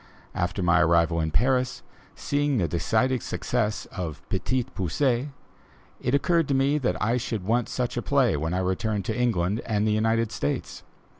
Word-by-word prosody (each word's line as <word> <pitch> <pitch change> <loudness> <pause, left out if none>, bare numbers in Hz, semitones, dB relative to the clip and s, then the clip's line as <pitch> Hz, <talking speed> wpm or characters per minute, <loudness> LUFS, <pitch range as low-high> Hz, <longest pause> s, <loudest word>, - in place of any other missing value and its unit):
After 90 +2 -2
my 90 0 +4
arrival 85 0 +3
in 80 - -1
Paris, 125 - +1 0.3
seeing 145 -1 0
the 90 -6 +1
decided 115 - +1
success 110 -4 -2
of 80 -4 -5
"Petit 120 +6 0
Poucet," 125 - -1 0.7
it 125 +3 +1
occurred 165 +2 +2
to 140 - +1
me 140 +3 +2
that 90 -10 -1
I 115 +4 +1
should 110 -5 -3
want 115 +4 0
such 125 -1 -2
a - - 0
play 135 - +2
when 80 +4 -2
I 95 - 0
returned 95 +2 -1
to 110 - -2
England 110 -4 0
and 105 -2 0
the - - +2
United 110 +1 +1
States. 70 - -3
110 Hz, 170 wpm, -26 LUFS, 90-125 Hz, 0.7 s, my